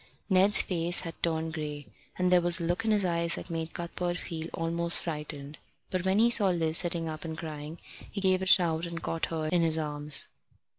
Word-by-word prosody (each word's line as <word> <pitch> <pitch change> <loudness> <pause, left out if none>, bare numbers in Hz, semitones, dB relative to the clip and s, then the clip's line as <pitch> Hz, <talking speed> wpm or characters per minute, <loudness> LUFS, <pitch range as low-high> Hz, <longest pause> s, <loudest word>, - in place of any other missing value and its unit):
Ned's 190 +2 +5
face 175 -1 +2
had 165 -3 -7
turned 160 -1 -2
grey, 150 -2 -6 0.3
and 180 0 0
there 180 -1 +5
was 175 +1 +5
a - - -4
look 175 +6 -2
in - - 0
his 210 -3 +2
eyes 170 -1 +2
that - - -8
made 165 0 -5
Cuthbert 175 +1 -4
feel 165 -2 -6
almost 170 +1 0
frightened. 150 -2 -7 0.3
But 185 -1 -2
when 190 +1 +2
he 235 +2 +4
saw 205 -4 +6
Liz 165 -2 +3
sitting 170 -2 -1
up 155 -1 -6
and 160 -1 -6
crying 155 0 -8 0.3
he 205 - -6
gave 190 -1 +1
a 190 - -3
shout 170 -2 +2
and 170 -1 -7
caught 165 0 -3
her 160 -1 -4
in 175 +1 +1
his 160 -1 +2
arms. 150 -1 +1
170 Hz, 210 wpm, -28 LUFS, 160-180 Hz, 0.3 s, saw